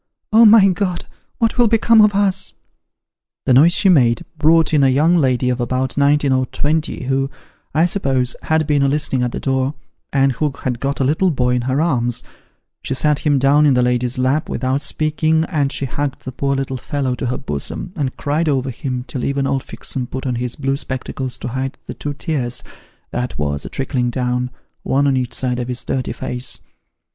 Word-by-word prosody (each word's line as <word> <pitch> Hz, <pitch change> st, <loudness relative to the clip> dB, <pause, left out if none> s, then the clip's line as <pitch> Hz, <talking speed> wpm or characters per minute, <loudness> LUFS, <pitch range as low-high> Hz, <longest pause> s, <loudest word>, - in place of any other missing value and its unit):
' -, -, -27 dB
Oh, 230 Hz, +1 st, +8 dB
my 210 Hz, -2 st, +8 dB
God! 185 Hz, -1 st, -2 dB, 0.3 s
what 230 Hz, +1 st, 0 dB
will 240 Hz, -, +6 dB
become 225 Hz, 0 st, +5 dB
ot 210 Hz, -1 st, +4 dB
us? 190 Hz, -, +1 dB, 0.5 s
' -, -, -70 dB
The 130 Hz, -, +3 dB
noise 155 Hz, +7 st, +6 dB
she 195 Hz, -, +5 dB
made, 125 Hz, -, +4 dB
brought 160 Hz, +1 st, +4 dB
in 150 Hz, -, +4 dB
a 135 Hz, -, +5 dB
young 155 Hz, +7 st, +3 dB
lady 130 Hz, -5 st, +2 dB
of 125 Hz, 0 st, -2 dB
about 130 Hz, +2 st, -1 dB
nineteen 145 Hz, 0 st, +3 dB
or 130 Hz, -1 st, +1 dB
twenty, 155 Hz, 0 st, -1 dB
who, 135 Hz, +1 st, 0 dB, 0.5 s
I 160 Hz, +2 st, +4 dB
suppose, 135 Hz, -9 st, 0 dB
had 160 Hz, 0 st, +1 dB
been 145 Hz, -1 st, +2 dB
a 140 Hz, -, +3 dB
listening 135 Hz, -2 st, 0 dB
at 125 Hz, -1 st, 0 dB
the -, -, -4 dB
door, 135 Hz, +1 st, -1 dB, 0.4 s
and 135 Hz, -1 st, +3 dB
who 145 Hz, +4 st, -1 dB
had 125 Hz, -2 st, -2 dB
got 140 Hz, +1 st, -2 dB
a -, -, +3 dB
little 160 Hz, +8 st, +2 dB
boy 125 Hz, -5 st, +1 dB
in 125 Hz, -, +1 dB
her 130 Hz, +2 st, +1 dB
arms: 125 Hz, -7 st, 0 dB, 0.6 s
she 135 Hz, -, -3 dB
sat 150 Hz, +1 st, +2 dB
him 145 Hz, -2 st, +2 dB
down 140 Hz, +3 st, +4 dB
in 135 Hz, -, +4 dB
the 125 Hz, -, +3 dB
lady's 125 Hz, +1 st, 0 dB
lap, 130 Hz, +4 st, 0 dB
without 130 Hz, +2 st, -1 dB
speaking, 155 Hz, +1 st, +1 dB
and 145 Hz, -6 st, -1 dB
she 140 Hz, -, -1 dB
hugged 140 Hz, +1 st, -4 dB
the 130 Hz, -, -4 dB
poor 140 Hz, +2 st, -1 dB
little 135 Hz, -1 st, -3 dB
fellow 135 Hz, 0 st, -2 dB
to 125 Hz, 0 st, -3 dB
her 125 Hz, -, -1 dB
bosom, 75 Hz, -, -5 dB
and 140 Hz, -6 st, -3 dB
cried 155 Hz, +3 st, 0 dB
over 135 Hz, -2 st, 0 dB
him, 125 Hz, 0 st, -4 dB
till 130 Hz, -, -5 dB
even 140 Hz, 0 st, 0 dB
old 135 Hz, -1 st, -1 dB
Fixem 130 Hz, -2 st, -5 dB
put 130 Hz, +1 st, -5 dB
on 125 Hz, -, 0 dB
his 120 Hz, 0 st, -3 dB
blue 135 Hz, -1 st, -1 dB
spectacles 130 Hz, -1 st, -5 dB
to -, -, -5 dB
hide 130 Hz, +2 st, -4 dB
the -, -, -6 dB
two 145 Hz, -1 st, -5 dB
tears, 130 Hz, -6 st, -3 dB, 0.5 s
that 125 Hz, +1 st, -3 dB
was 70 Hz, -1 st, -2 dB
a -, -, -5 dB
trickling 130 Hz, -2 st, -1 dB
down, 125 Hz, 0 st, -1 dB, 0.3 s
one 140 Hz, +2 st, +1 dB
on 140 Hz, -1 st, +2 dB
each 125 Hz, -2 st, -2 dB
side 125 Hz, -1 st, -1 dB
of 120 Hz, -, -3 dB
his 125 Hz, -1 st, -4 dB
dirty 130 Hz, -3 st, -2 dB
face. 125 Hz, 0 st, -5 dB
135 Hz, 210 wpm, -19 LUFS, 125-150 Hz, 0.6 s, Oh